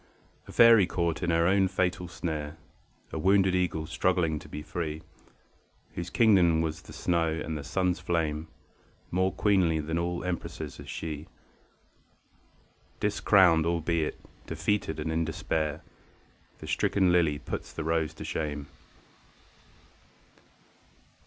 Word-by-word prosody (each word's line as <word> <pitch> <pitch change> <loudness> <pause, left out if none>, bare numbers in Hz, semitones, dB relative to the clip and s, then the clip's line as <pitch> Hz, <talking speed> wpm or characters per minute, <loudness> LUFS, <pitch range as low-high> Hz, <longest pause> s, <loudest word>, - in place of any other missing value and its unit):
A - - -9
faery 115 -5 +7
caught 85 -2 -1
in 90 - -1
her 85 0 +3
own 95 +1 +4
fatal 90 -1 -1
snare, 80 -3 -4 0.5
A 80 - -4
wounded 95 +2 +4
eagle 90 -4 0
struggling 85 -2 0
to - - -13
be 75 - -6
free, 80 -1 -4 0.9
Whose 85 0 -5
Kingdom 90 -8 +4
was 80 -1 -3
the - - -14
snow 85 -2 0 0.2
and 80 - -4
the 75 - -5
sun's 90 +4 0
flame 80 -2 -1 0.6
More 95 +2 +1
queenly 90 -6 +2
than 80 +2 -2
all 85 0 -2
empresses 90 -2 -5
is - - -10
she, 75 -2 -5 1.7
Discrowned 95 -5 +4
albeit, 85 -1 -1 0.3
defeated 105 -7 -1
and 80 +1 -2
in 80 +1 +1
despair; 80 -2 -2 0.7
The - - -10
stricken 95 -3 +2
lily 85 -4 +3
puts - - -6
the 80 - -5
rose 80 -1 0
to - - -8
shame. 75 -2 -4
85 Hz, 125 wpm, -28 LUFS, 80-90 Hz, 1.7 s, faery